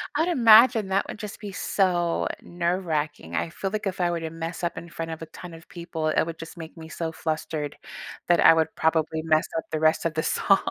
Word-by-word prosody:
I'd 320 +3 +2
imagine 230 - +6
that 190 +1 +1
would - - -7
just 210 -1 -7
be 205 -2 -7
so 180 -3 +1
nerve-racking, 170 - -2
I 80 +1 -1
feel 195 - -4
like 210 -2 -2
if 185 - -4
I 175 - +2
were 170 - -1
to 165 -1 -4
mess 165 +2 -6
up 170 - -2
in 170 - -7
front 165 0 -5
of 160 - -7
a - - -5
ton 175 +2 -10
of 165 +1 -13
people, 170 -2 -4
it 155 - +2
would 165 0 -7
just 165 +1 -9
make 160 -1 -9
me 160 -1 -9
so 165 -1 -4
flustered 155 -2 -3 0.5
that 175 - +4
I - - +8
would 160 -1 +1
probably 160 0 +1
mess 155 -1 +2
up 160 - -2
the 155 - -1
rest 155 +1 +2
of 165 - 0
the 160 0 -1
song. 195 - +3
165 Hz, 235 wpm, -25 LUFS, 160-185 Hz, 0.5 s, I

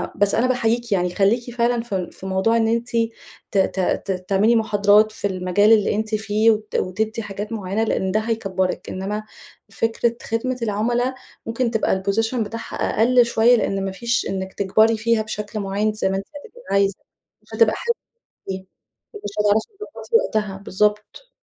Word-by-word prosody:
بس 200 0 +2
أنا 240 +3 +2
باحييكِ 235 -2 0
يعني 180 -2 +1
خليكِ 235 +4 +1
فعلًا 240 0 +1
في 190 -6 -3
في - - -12
موضوع 190 +4 +2
إن 225 -1 +2
أنتِ 235 +1 0 0.6
ت 205 - -1
ت 190 0 +1 0.3
ت - - -1 0.2
تعملي 205 +4 +4
محاضرات 210 -1 +4
في 205 - -2
المجال 185 +2 +2
اللي 210 -2 +3
أنتِ 215 +1 -1
فيه، 215 +1 +2
وت 215 -1 -3
وتدّي 220 +5 -1
حاجات 205 +1 -6
معينة 205 0 -1
لإن 190 -4 0
ده 215 - +2
هيكبّرِك، 195 -5 -2
إنما 205 +3 -4 0.5
فكرة 230 +1 0
خدمة 245 +3 -2
العملا 240 +4 0 0.3
ممكن 230 +1 -1
تبقى 215 -4 0
الposition 225 +4 +1
بتاعها 230 -1 -4
أقل 245 +2 +3
شوية 235 +1 +4
لإن 195 -4 -1
ما 195 - -2
فيش 235 +5 -1
إنك 190 0 -4
تكبري 220 +3 +3
فيها 230 +1 +1
بشكل 215 0 -5
معيَّن، 205 +2 -1
زي 210 -2 0
ما 190 - -1
أنتِ 195 - -5 0.2
هتبقي 485 +6 -15
عايزة، 200 -1 +2 0.5
مش - - -26
هتبقى 460 - +4
حلوة 470 0 -1 0.6
أوي 190 0 -5 0.5
ومش 415 - -6
هتعرفي 210 +1 +3
تضبطي 430 +2 -2
وقتها، 210 - 0
بالضبط. 210 - -1
215 Hz, 170 wpm, -21 LUFS, 195-230 Hz, 0.6 s, تعملي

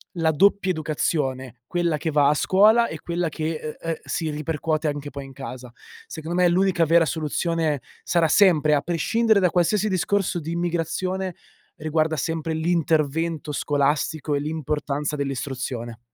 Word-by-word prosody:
la 165 -2 +1
doppia 195 +4 +3
educazione, 135 -6 -2
quella 175 0 0
che 160 +2 -2
va 145 -1 +4
a - - +4
scuola 215 +9 +4
e 160 - -7
quella 170 -1 -2
che, 160 +1 -3
ehm, 155 0 -6
ehm, 165 0 -2
si 160 - -2
ripercuote 155 +1 -2
anche 145 0 -5
poi 140 0 -7
in 135 - -11
casa. 130 -2 -8 0.3
Secondo 165 +2 -5
me - - +6
l'unica 185 -1 +2
vera 165 +1 +4
soluzione 160 0 -1 0.2
sarà 170 -2 +2
sempre, 155 -4 +4
a 145 - +1
prescindere 220 +7 +2
da 180 -2 +3
qualsiasi 190 +5 +2
discorso 190 -1 0
di 160 +2 -5
immigrazione, 175 +2 -2 0.4
riguarda 155 +1 0
sempre 165 +3 -2
l'intervento 160 -1 0
scolastico 145 +1 0
e - - 0
l'importanza 150 -1 -2
dell'istruzione. 130 -4 -4
160 Hz, 150 wpm, -23 LUFS, 145-175 Hz, 0.4 s, me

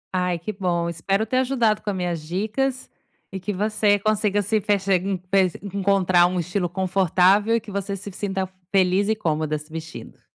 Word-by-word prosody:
Ai, 180 -1 0
que 170 +6 -5
bom, 175 -3 -1
espero 195 +6 -1
ter 255 +3 -1
ajudado 245 -5 +1
com 210 - -4
as 200 - -1
minhas 175 -3 -2
dicas, 215 - -2 0.4
e 190 - -5
que 200 +3 -3
você 205 +1 +2
consiga 205 0 +1
se 215 +2 0
fe 205 +1 +1
enf 190 -1 0
encontrar 195 -3 +3
um 180 0 -2
estilo 180 +1 -2
confortável, 190 +3 +3
e - - +2
que 215 -1 -11
você 200 0 -3
se 200 +1 -8
sinta 190 0 -3 0.2
feliz 195 +1 +3
e 220 - +2
cômoda 155 -5 -1
se 150 +1 -13
vestindo. 160 0 -8
195 Hz, 180 wpm, -23 LUFS, 180-205 Hz, 0.4 s, encontrar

